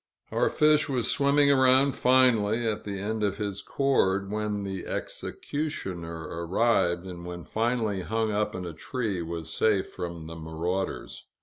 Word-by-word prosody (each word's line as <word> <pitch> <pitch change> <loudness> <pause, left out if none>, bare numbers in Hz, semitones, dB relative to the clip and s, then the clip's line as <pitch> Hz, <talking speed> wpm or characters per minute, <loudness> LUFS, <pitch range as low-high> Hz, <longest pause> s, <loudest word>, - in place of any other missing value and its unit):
Our - - +2
fish 150 -1 +3
was 125 -4 +1
swimming 140 0 +4
around 130 0 +5
finely, 120 -3 +4
at 110 -1 -2
the 100 -1 -4
end 110 +2 -2
of 100 -1 0
his 100 -2 -3
cord, 100 -8 +1
when 105 -1 -2
the 95 -2 -5
executioner 85 - -4 0.2
arrived, 90 -2 +2
and 90 -2 -8
when 90 0 -7
finally 110 -3 0
hung 110 +3 -1
up 105 0 -1
in 90 -1 -4
a 85 - -5
tree 105 +2 -3
was 80 -1 -5
safe 105 -4 +2
from 85 -3 -6
the 80 +1 -8
marauders. 80 +4 -4
105 Hz, 150 wpm, -27 LUFS, 90-120 Hz, 0.2 s, around